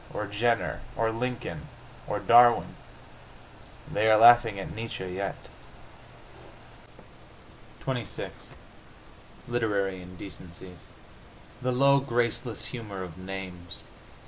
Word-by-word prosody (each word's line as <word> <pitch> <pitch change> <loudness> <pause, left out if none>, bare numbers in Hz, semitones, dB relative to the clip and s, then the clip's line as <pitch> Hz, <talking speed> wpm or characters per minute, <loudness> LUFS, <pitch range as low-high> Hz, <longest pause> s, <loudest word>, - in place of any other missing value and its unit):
Or 105 - -3
Jenner? 105 - 0
Or 115 -1 +1
Lincoln? 125 +2 -4 0.4
Or 105 - -1
Darwin?... 120 +4 +6 1.2
They 110 +1 +3
are 110 - +7
laughing 115 -2 +7
at 95 - -6
Nietzsche 110 -4 -5
yet.... 95 +2 -3 2.5
XXVI 125 -5 -3 1.2
LITERARY 100 -6 -1
INDECENCIES 90 -1 -11 0.8
The 125 0 0
low, 140 +2 +5
graceless 120 -3 -1
humor 105 -6 -6
of 90 -1 -9
names! 95 -2 -7
105 Hz, 90 wpm, -28 LUFS, 95-120 Hz, 2.5 s, are